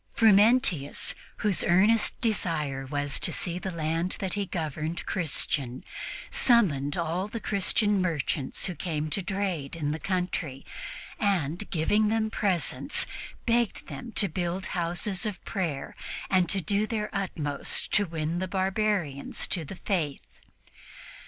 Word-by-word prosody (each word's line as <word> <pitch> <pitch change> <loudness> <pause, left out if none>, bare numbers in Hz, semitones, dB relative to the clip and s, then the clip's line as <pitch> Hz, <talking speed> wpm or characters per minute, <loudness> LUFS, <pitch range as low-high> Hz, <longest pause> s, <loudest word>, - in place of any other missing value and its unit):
Frumentius, 215 - +4 0.3
whose 205 -4 +3
earnest 205 +6 +4
desire 155 - -1
was 145 0 -1
to - - +2
see 175 -1 -1
the 190 - -3
land 165 +1 -1
that 190 -2 -2
he 205 -1 -1
governed 160 -1 -3
Christian, 140 -6 0 0.5
summoned 195 - +4
all 170 +3 -1
the 230 +2 -5
Christian 205 0 +2
merchants 150 -5 0
who 180 - -1
came 155 -2 -3
to 195 - 0
trade 185 -7 -2
in 150 -3 -1
the 155 - -3
country 175 -7 -2 0.5
and, 190 - 0
giving 205 +6 +2
them 220 0 +1
presents, 190 -7 +1 0.4
begged 235 -2 +1
them 245 - -7
to 200 - +3
build 180 +2 -2
houses 175 +2 0
of 205 -4 -4
prayer 165 -9 -2 0.4
and 185 -3 +4
to 195 +1 +2
do 200 +5 +1
their 215 -2 -2
utmost 160 -8 -1
to 205 -1 +4
win 165 +1 -2
the 185 - -1
barbarians 190 -6 0
to 170 - 0
the 160 - -7
Faith. 165 -7 -1
180 Hz, 135 wpm, -28 LUFS, 155-205 Hz, 0.5 s, Frumentius